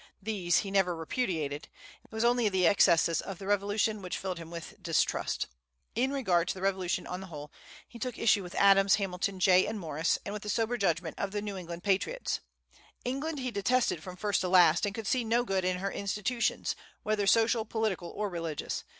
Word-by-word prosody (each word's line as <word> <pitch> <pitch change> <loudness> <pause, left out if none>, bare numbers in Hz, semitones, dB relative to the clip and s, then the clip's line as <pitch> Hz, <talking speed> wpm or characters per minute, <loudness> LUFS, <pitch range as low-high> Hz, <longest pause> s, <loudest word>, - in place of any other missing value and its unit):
These 190 -5 0
he 195 - -5
never 190 -3 +2
repudiated. 160 - -2 0.4
It - - -24
was 220 0 -2
only 240 -2 +3
the 190 -2 +2
excesses 165 -2 +4
of 195 - -7
the 195 - -9
Revolution 205 +1 +1
which 180 -1 -4
filled 185 -3 -4
him 165 -1 -9
with 170 -1 -9
distrust. - - 0 0.5
In 255 +4 +1
regard 185 -11 +1
to - - 0
the 190 - -8
Revolution 190 -2 0
on 180 - -5
the 190 - -8
whole, 150 -3 -9 0.4
he 235 - -12
took 245 0 -4
issue 220 -3 +3
with 180 -2 -9
Adams, 195 0 +6
Hamilton, 195 -1 -2
Jay, 185 0 +5
and 220 - -3
Morris, 160 -2 0
and 200 - -4
with 210 - -5
the 210 - -6
sober 225 +3 0
judgment 170 -6 -1
of 200 - -1
the 205 - -1
New 205 -2 -4
England 175 -2 -7
patriots. 205 - 0 0.7
England 285 +5 -2
he 255 -1 -2
detested 230 -3 +1
from 180 +2 -8
first 205 0 0
to 180 - -1
last, 175 0 +5
and 200 - -4
could 225 -2 -5
see 250 +4 +1
no 230 +2 +2
good 195 -5 0
in 185 0 0
her 195 +2 -3
institutions, 210 +4 -1 0.3
whether 210 -2 0
social, 225 +1 +4
political, 215 -5 -2
or 210 0 -3
religious. 165 -5 -4
195 Hz, 200 wpm, -30 LUFS, 180-220 Hz, 0.7 s, Adams